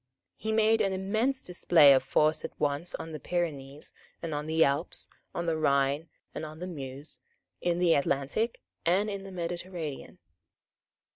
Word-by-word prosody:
He 220 - -3
made 220 0 +4
an 195 -2 +1
immense 220 +8 0
display 165 -5 +6
of 130 - +4
force 155 +4 +2
at - - -7
once 145 +4 0
on 165 - -6
the 155 - -6
Pyrenees 145 -4 -3 0.3
and 165 -2 -4
on 150 +1 -3
the 160 +1 +4
Alps, 140 +5 0 0.3
on 170 - -2
the 165 -1 +1
Rhine 140 0 +1 0.2
and - - -5
on 155 0 -7
the 180 - -5
Meuse, 140 -4 -6 0.4
in 175 -1 +1
the 175 -2 +4
Atlantic 140 - 0 0.2
and 195 +5 +2
in 195 -1 -5
the 195 - -8
Mediterranean. 170 -3 -5
165 Hz, 160 wpm, -29 LUFS, 145-185 Hz, 0.4 s, display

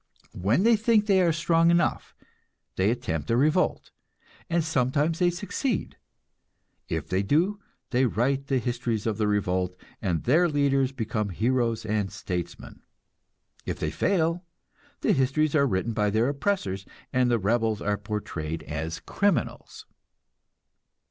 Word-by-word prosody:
When 110 - +1
they 230 +1 +6
think 220 -1 +3
they 195 -3 +4
are 170 -2 +3
strong 165 +2 +3
enough, 170 0 +1 0.6
they 95 +2 +2
attempt 80 - -2
a 115 - +3
revolt, 155 +7 +1 0.6
and 170 -1 +1
sometimes 150 +2 0
they 180 -1 +4
succeed. 205 +6 -3 0.9
If 80 -2 -2
they 95 +1 0
do, 170 - +1 0.3
they 130 0 +3
write 135 +5 0
the 135 - +1
histories 120 -3 -2
of 110 -2 -1
the 105 - +2
revolt, 90 -3 0 0.3
and 90 -7 -1
their 165 +8 +4
leaders 140 -3 +2
become 110 -4 -2
heroes 115 +3 0
and 105 -2 -1
statesmen. 90 -2 -6 0.9
If - - -2
they - - -1
fail, 170 -2 0 0.6
the - - +3
histories 140 +3 +1
are 140 -3 +4
written 105 +1 -1
by 105 -2 +1
their 110 +5 +2
oppressors, 140 - -1 0.3
and 125 -1 +3
the 120 - +3
rebels 110 +1 +1
are 105 0 0
portrayed 85 -7 -4
as 80 +2 -5
criminals. 200 -3 -1
125 Hz, 140 wpm, -26 LUFS, 105-160 Hz, 0.9 s, they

